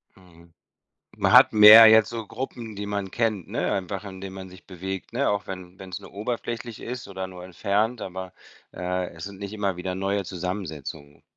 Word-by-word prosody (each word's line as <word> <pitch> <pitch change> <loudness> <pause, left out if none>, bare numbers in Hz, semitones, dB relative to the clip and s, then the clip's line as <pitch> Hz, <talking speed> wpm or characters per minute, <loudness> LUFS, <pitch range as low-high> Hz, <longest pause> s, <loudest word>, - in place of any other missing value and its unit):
Mhm. 85 -2 -20 0.6
Man - - +1
hat - - +8
mehr 110 +1 +11
jetzt 110 0 +6
so 115 -2 -5
Gruppen, 115 -2 -7
die 100 0 -5
man 100 -2 -3
kennt, 110 -6 -1
ne, - - -2
einfach 95 +1 -3
in 95 -2 -9
denen 95 0 -7
man 95 -1 -8
sich 90 0 -16
bewegt, 95 +2 -7
ne, 135 +4 +1
auch 100 0 -1
wenn 95 -1 -9
wenn's 95 -2 -8
nur - - -13
oberflächlich 115 +2 -5
ist 125 +1 -6
oder 95 -1 -5
nur 90 -1 -11
entfernt, 105 +5 -1
aber, 95 0 -7 0.4
äh, 90 0 -3
es 85 -1 -8
sind 100 -1 -10
nicht 100 0 -6
immer 100 -4 -2
wieder 90 +1 -4
neue 100 +1 -1
Zusammensetzungen. 80 -6 -6
95 Hz, 190 wpm, -25 LUFS, 90-105 Hz, 0.6 s, mehr